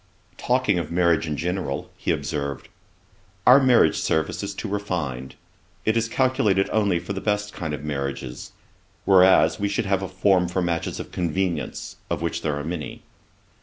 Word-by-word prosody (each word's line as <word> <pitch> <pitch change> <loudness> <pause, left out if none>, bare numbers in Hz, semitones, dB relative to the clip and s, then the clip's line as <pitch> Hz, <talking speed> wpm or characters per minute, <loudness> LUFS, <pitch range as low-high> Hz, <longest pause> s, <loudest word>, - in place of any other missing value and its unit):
Talking 125 -7 +1
of 85 - -5
marriage 85 -2 +2
in 75 -1 -3
general, 90 -5 -3
he - - -5
observed, 70 -2 -2 0.8
'Our 125 +2 +8
marriage 125 - +4
service 90 +3 0
is 100 -1 -5
too 110 - -5
refined. 85 -11 -3 0.5
It 110 - +2
is 115 0 0
calculated 125 -7 +2
only 100 -5 +2
for 90 +4 -5
the 95 - -5
best 105 -1 -1
kind 80 -3 -4
of 75 -1 -5
marriages; 70 -4 -4 0.5
whereas, 95 +1 +5
we 100 0 0
should 100 +2 -1
have 100 -1 +1
a 95 - -3
form 95 -1 +2
for 90 +2 -2
matches 85 -1 -2
of - - -7
convenience, 90 +1 -2
of 80 - -2
which 85 0 -2
there 75 -3 -1
are 75 - -4
many.' 80 -4 -5
90 Hz, 165 wpm, -24 LUFS, 80-100 Hz, 0.8 s, Our